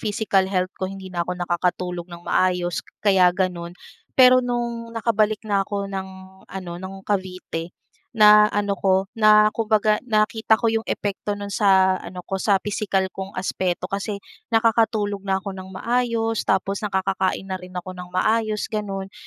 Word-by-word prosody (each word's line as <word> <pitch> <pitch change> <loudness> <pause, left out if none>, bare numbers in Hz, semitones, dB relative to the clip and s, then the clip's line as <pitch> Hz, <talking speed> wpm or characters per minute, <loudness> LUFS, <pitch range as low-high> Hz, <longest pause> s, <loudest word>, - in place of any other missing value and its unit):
physical 205 -3 +1
health 185 -1 -1
ko, 190 - -1
hindi 190 -1 -9
na 175 - -2
ako 180 - -2
nakakatulog 175 0 -2
ng 170 0 -11
maayos 180 -2 +1 0.2
kaya 190 -3 +5
gano'n. 175 -2 -2 0.4
Pero 255 -1 +7
no'ng 235 -2 -3
nakabalik 215 -1 +1
na 205 -2 +1
ako 200 0 -3
ng 190 -1 -4 0.4
ano, 185 -3 -7
ng 190 +1 -7
Cavite, 185 -4 -4 0.4
na 210 0 +7
ano 205 -1 -1
'ko, 190 0 +3
na 215 -1 +5
kumbaga 215 -1 +1
nakita 220 0 +2
ko 225 0 0
'yong 225 0 -2
epekto 205 0 -2
no'n 205 0 -6
sa 190 -2 +4
ano 180 0 -9
ko, 190 0 -3
sa 200 -1 +3
pisikal 200 -1 -1
kong 190 0 -7
aspeto 185 -1 -2
kasi 200 +1 -3 0.3
nakakatulog 225 -3 +2
na 195 -1 0
ako 195 +1 -5
ng 190 0 -9
maayos, 230 +2 -1
tapos 195 +1 +1
nakakakain 190 -2 -1
na 190 -1 -5
rin 180 0 -11
ako 180 +1 -5
ng 180 -1 -9
maayos, 215 +4 0
gano'n. 195 -2 -4
195 Hz, 160 wpm, -23 LUFS, 185-215 Hz, 0.4 s, Pero